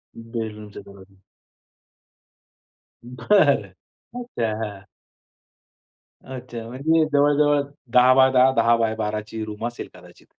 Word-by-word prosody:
बेडरूमचा 110 -3 -7
दरवाजा. 100 -1 -16 1.9
बरं. 125 - +1 0.4
अच्छा. 125 - -4
हां. 100 -2 -8 1.4
अच्छा. 125 -3 -9
म्हणजे 155 +6 +1
जवळ-जवळ 145 0 +3 0.3
10*10 130 +1 +5
10*12 110 -2 0
ची 110 0 -6
रूम 110 +2 -5
असेल 120 - -8
कदाचित. - - -18
120 Hz, 80 wpm, -22 LUFS, 110-130 Hz, 1.9 s, 10*10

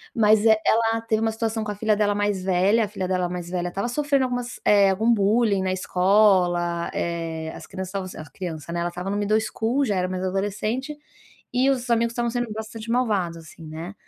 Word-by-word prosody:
Mas, 215 -1 +4
eh, 220 -1 +5
ela 225 0 +2
teve 225 -1 -1
uma 225 0 +1
situação 220 0 -2
com 210 - -4
a - - -6
filha 215 +1 +1
dela 205 -1 +2
mais 205 -2 0
velha. 195 +4 +3
A - - -4
filha 195 -3 -4
dela 180 -1 0
mais 175 -1 -5
velha 175 -1 -2
estava 195 +6 -3
sofrendo 280 +1 +1
algumas, 245 -1 -4
eh, 200 -2 +5
algum 220 +5 +2
bullying 205 -1 +2
na 185 - 0
escola, 180 -2 +2
eh, 165 -2 -3
as - - -10
crianças 190 -1 -6
estavam 190 0 -4
s 185 - -9
"as 155 -2 -9
criança", 165 0 -6
né, 170 - -2
ela 175 0 -1
estava 180 +2 -6
no 200 - -1
middle 210 +1 +2
school, 230 +5 -1
já 205 - 0
era 180 0 0
mais 185 0 -4
adolescente, 210 +9 -2 0.6
e 260 +2 +3
os 255 -2 -1
amigos 235 0 +2
estavam 235 0 -1
sendo 240 -2 -2
bastante 220 +1 -7
malvados, 205 -9 0
assim, 165 0 -14
né. 165 +5 -7
205 Hz, 215 wpm, -24 LUFS, 180-225 Hz, 0.6 s, eh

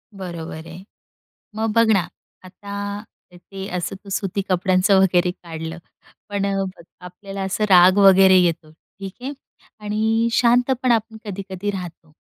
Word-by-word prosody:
बरोबर 170 -3 -7
आहे. 170 +3 -11 0.7
मग 220 0 -1
बघ 230 0 +5
ना, 190 -4 +2 0.4
आता 200 +2 -6 0.3
ते 190 +2 -9
असं 180 +2 -4
तू 200 - -12
सुती 195 0 -2
कपड्यांचं 185 +2 +3
वगैरे 180 -1 +2
काढलं, 165 -2 -8 0.5
पण 200 -1 -2 0.3
बघ, - - -16 0.2
आपल्याला 195 +2 -8
असं 190 +3 -2
राग 185 +1 +7
वगैरे 195 -1 +7
येतो 165 -3 0
ठीक 190 +4 -12
आहे 270 +3 -4 0.5
आणि 220 +2 0
शांतपण 245 +2 +2
आपण 225 -1 0
कधी-कधी 195 0 -5
राहतो. 170 -4 -8
195 Hz, 130 wpm, -21 LUFS, 180-205 Hz, 0.7 s, राग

